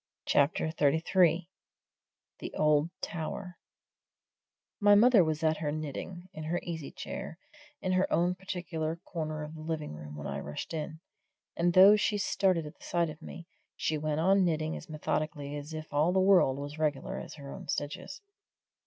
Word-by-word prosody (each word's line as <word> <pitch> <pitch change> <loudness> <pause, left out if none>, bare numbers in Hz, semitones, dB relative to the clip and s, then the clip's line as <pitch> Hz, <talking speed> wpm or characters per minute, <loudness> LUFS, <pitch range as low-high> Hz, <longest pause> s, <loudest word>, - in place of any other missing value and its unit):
CHAPTER 145 +2 +2
XXXIII 165 +3 +3 0.9
THE - - -6
OLD 150 +1 +3
TOWER 175 +2 -5 1.2
My 205 -1 +6
mother 225 -2 +7
was 155 0 -1
at 155 0 +3
her 150 -1 -2
knitting, 155 +4 -5
in 155 - -7
her 175 +3 0
easy 160 -4 -5
chair, 160 - -7 0.5
in 185 - 0
her 185 +1 +2
own 175 +2 +3
particular 175 -4 -4
corner 155 -2 -4
of 150 +1 -7
the 155 - -9
living 155 - -3
room 75 0 -9
when 75 -1 -7
I - - -3
rushed 75 - -6
in, 155 0 -4 0.5
and 175 +1 +2
though 195 +3 +9
she 210 0 +1
started 185 -4 +1
at 150 - -10
the - - -16
sight 170 -2 0
of 155 - -13
me, 170 - -9 0.3
she 155 -1 -1
went 155 0 -1
on 195 +3 +4
knitting 160 -2 0
as - - -9
methodically 150 -1 -2
as 145 +1 -6
if 155 -1 -7
all 150 +4 +3
the 190 - +3
world 185 -8 +5
was 145 +2 -6
regular 150 -3 -1
as - - -8
her 140 -2 -9
own 185 - -9
stitches. 145 - -4
160 Hz, 170 wpm, -30 LUFS, 150-180 Hz, 1.2 s, though